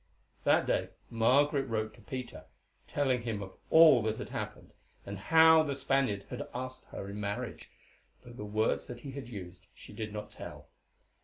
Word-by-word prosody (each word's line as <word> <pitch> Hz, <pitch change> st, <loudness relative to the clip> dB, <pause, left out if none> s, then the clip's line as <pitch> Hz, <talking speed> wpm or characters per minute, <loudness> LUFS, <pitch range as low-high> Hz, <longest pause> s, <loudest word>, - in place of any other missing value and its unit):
That -, -, +4 dB
day -, -, 0 dB, 0.2 s
Margaret 135 Hz, +5 st, +3 dB
wrote 110 Hz, -2 st, -2 dB
to 115 Hz, -, -17 dB
Peter, 125 Hz, +4 st, -7 dB, 0.4 s
telling 130 Hz, -4 st, +1 dB
him 110 Hz, -4 st, -3 dB
of 95 Hz, -1 st, -10 dB, 0.2 s
all 160 Hz, -6 st, +8 dB
that 110 Hz, 0 st, -1 dB
had -, -, -6 dB
happened, -, -, -6 dB, 0.3 s
and 100 Hz, -, -5 dB
how 160 Hz, +6 st, +7 dB
the 145 Hz, -3 st, -1 dB
Spaniard 135 Hz, -7 st, +1 dB
had -, -, -5 dB
asked 130 Hz, +1 st, -5 dB
her 100 Hz, -, -7 dB
in 100 Hz, +1 st, -6 dB
marriage, 100 Hz, 0 st, -4 dB, 0.5 s
though 120 Hz, -, -12 dB
the 110 Hz, -, -7 dB
words 110 Hz, +2 st, 0 dB
that 120 Hz, -1 st, -8 dB
he 140 Hz, -, -7 dB
used 105 Hz, -8 st, -8 dB
she -, -, -13 dB
did 105 Hz, 0 st, -5 dB
not 105 Hz, 0 st, -6 dB
tell. -, -, -10 dB
115 Hz, 170 wpm, -31 LUFS, 105-135 Hz, 0.5 s, all